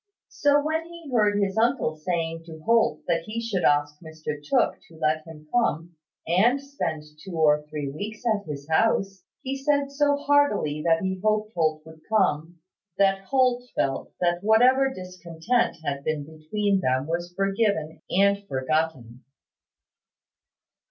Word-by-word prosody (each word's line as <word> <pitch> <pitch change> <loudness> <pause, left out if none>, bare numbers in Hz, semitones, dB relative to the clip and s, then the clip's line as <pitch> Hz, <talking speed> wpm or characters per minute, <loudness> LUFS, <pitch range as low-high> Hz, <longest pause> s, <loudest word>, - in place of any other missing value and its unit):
So 290 0 +3
when 320 +2 -1
he 335 -4 -11
heard 210 -4 +3
his 200 -1 0
uncle 235 - +1
saying 165 0 -3
to 160 -2 -11
Holt 230 -9 +3
that 170 -1 +1
he 220 +2 -4
should 225 -5 -2
ask 145 0 +2
Mr 155 -2 -7
Tooke 145 - +1
to 165 - -16
let 155 0 0
him 155 -2 -12
come 175 -8 0 0.3
and 215 +11 +3
spend 225 - -4 0.2
two 190 -2 -8
or 150 -2 +3
three 150 -2 -4
weeks 210 - -7
at 210 -5 0
his 140 -1 -6
house, 195 +2 +1 0.2
he 270 +1 -3
said 280 0 0
so 285 0 +2
heartily 285 - +2
that 165 +1 +3
he 190 -1 -2
hoped 215 0 +1
Holt 155 -2 0
would 160 0 -14
come, 175 -6 +1 0.4
that 195 -1 +2
Holt 250 0 +1
felt 135 -1 -1
that 175 +1 0
whatever 255 +5 +4
discontent 180 +2 -2
had 140 0 -2
been 155 -1 -2
between 190 +6 -1
them 130 -4 0
was 170 +2 -3
forgiven 195 -5 0
and 200 +1 +3
forgotten. 130 - -2
180 Hz, 150 wpm, -25 LUFS, 155-225 Hz, 0.4 s, whatever